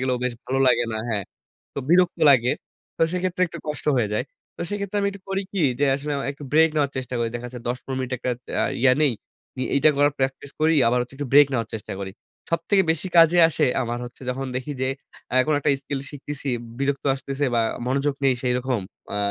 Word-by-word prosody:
গেলেও 130 -1 +1
বেশ 125 - 0
ভালো 135 +1 -1
লাগে 120 -1 +4
না। - - -2
হ্যাঁ, 105 -4 -1 0.5
তো - - -4
বিরক্ত 175 +1 +4
লাগে। 125 -2 +4 0.4
তো - - 0
সেক্ষেত্রে 180 0 -1
একটু 170 0 -9
কষ্ট 150 -2 -4
হয়ে 115 -4 +1
যায়। 105 +4 0 0.3
তো - - -12
সেক্ষেত্রে 205 0 -3
আমি 200 - +1
একটু 200 -1 -12
করি 195 +1 -1
কি 195 - -1 0.2
যে, - - +5
আসলে 145 +2 -3
আ - - -3
একটু 145 +1 -11
ব্রেক 160 +1 +6
নেওয়ার 145 -2 +1
চেষ্টা 130 -1 -4
করি। 115 -1 0
দেখা 120 +1 -4
যায় 125 -2 -8
১০-১৫ 130 +2 -4
মিনিট 130 0 -4
একটা 125 - -2 0.3
আ - - +2 0.2
ইয়ে 130 -1 +6
নেই। 145 -4 +4 0.5
ই - - 0
এইটা 140 +3 +5
করার 145 +1 +4
প্র্যাকটিস 135 +1 -2
করি 160 +1 +4
আবার 125 +1 +2
হচ্ছে 125 +2 -10
একটু 145 +1 -4
ব্রেক 145 +1 +8
নেওয়ার 115 -4 -1
চেষ্টা 110 - -6
করি। 95 -1 -5 0.4
সবথেকে 190 +4 +2
বেশি 165 +3 -1
কাজে 165 +1 +7
আসে 155 -1 +1 0.2
আমার 120 0 -3
হচ্ছে 120 +2 -11
যখন 135 +1 -3
দেখি 130 +3 -4
যে, 130 - +1 0.4
আ - - 0
কোনো 150 -1 +2
একটা 145 - +2
স্কিল 140 0 -3
শিখতেছি, 145 0 -6 0.3
বিরক্ত 140 0 -1
আসতেছে 135 +1 -3
বা 115 - +3 0.3
মনোযোগ 140 +2 +1
নেই 135 -1 +4
সেইরকম। 125 -1 0 0.3
আ - - -1
135 Hz, 220 wpm, -24 LUFS, 125-155 Hz, 0.5 s, ব্রেক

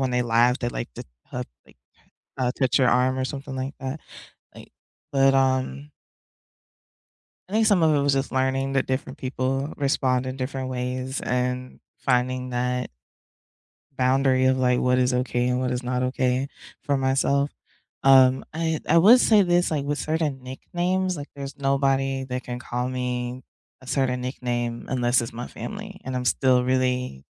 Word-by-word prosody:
when 130 -1 0
they 125 0 +1
laugh, 120 +1 +3
they 120 - -1
like - - -5
to - - -8
h - - -9 0.3
uh, - - -2 0.2
like, - - -21 0.8
touch 130 -3 +3
your 130 - +4
arm 130 +1 +2
or 130 - 0
something 135 0 -6
like 130 +2 -4
that, 135 +4 -4 0.6
like - - -13 0.4
But, 135 -1 +4
um 135 +2 0 1.6
I - - -10
think 220 0 +3
some 205 -5 +4
of 155 -2 +4
it 145 - +2
was 140 0 +2
just 135 0 -1
learning 130 +1 0
that 135 -1 +1
different 130 +1 -3
people 135 +2 -2
respond 130 -2 +1
in 130 0 -4
different 130 0 -4
ways 130 +1 -3
and 125 0 -2 0.2
finding 125 0 0
that 125 0 -1 1.1
boundary 130 0 +2
of, 130 0 +3
like, 125 -1 +2
what 125 0 +2
is 125 0 +2
okay 125 -1 0
and 125 0 +1
what 130 -1 -1
is 125 0 -2
not 125 0 -1
okay 130 +1 0 0.4
for 140 -1 +1
myself. 135 +1 +1 0.5
Um 130 -1 +6
I 160 -1 -1
I 165 - +4
would 225 +9 +8
say 215 -4 +5
this, 175 -2 +2
with 145 -1 -1
certain 150 -2 -2
nicknames, 180 +7 -2
like, 145 0 -7
there's 140 0 -7
nobody 135 -1 +1
that 125 0 -4
can 125 0 -5
call 125 0 -3
me 125 0 -3 0.4
a 130 - -15
certain 130 -2 0
nickname 120 -2 -3
unless 120 -1 +2
it's 115 0 -6
my 120 +2 -6
family. 205 -2 -8
And 130 0 -4
I'm 125 - -2
still 125 0 +3
really, 125 - -1
130 Hz, 170 wpm, -24 LUFS, 125-140 Hz, 1.6 s, would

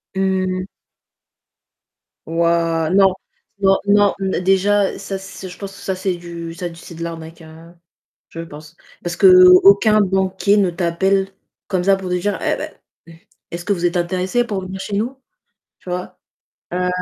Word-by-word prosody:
Mmh. 185 -1 -1 1.6
Waouh! 165 0 +1
Non, 195 -1 +5 0.5
non, 195 0 +4
non, 205 0 +4
n 190 -2 -1
déjà, 195 +2 +2
ça, 195 0 -5
c'est 190 0 -9
je 180 - -11
pense, 195 -1 -8
ça, 190 - -4
c'est 185 0 -2
du 170 -1 -8
ça 175 +1 -5
d 165 - -13
c'est 170 0 -12
de 165 - -6
l'arnaque, 165 0 -8
heu, 160 +1 -14 0.6
je 165 - -10
pense. 155 -1 -12 0.3
Parce 175 0 -3
qu'aucun 195 +3 +7
banquier 190 +1 +1
ne 195 -3 +3
t'appelle 190 +3 0 0.4
comme 185 -3 -1
ça, 195 +1 +4
pour 190 -1 -6
te 180 - 0
dire: 200 +3 -2
«Eh - - 0
beh, - - -6 0.8
est-ce 170 0 -6
que 205 - +1
vous 175 -2 -2
êtes 175 +1 +1
intéressé 185 +7 0
pour 205 -4 -3
venir 190 +1 -7
chez 195 +1 -4
nous?», 245 +6 -3 0.6
tu - - -12
vois? 180 0 -5 0.5
heu, 180 0 0
185 Hz, 160 wpm, -19 LUFS, 170-195 Hz, 1.6 s, qu'aucun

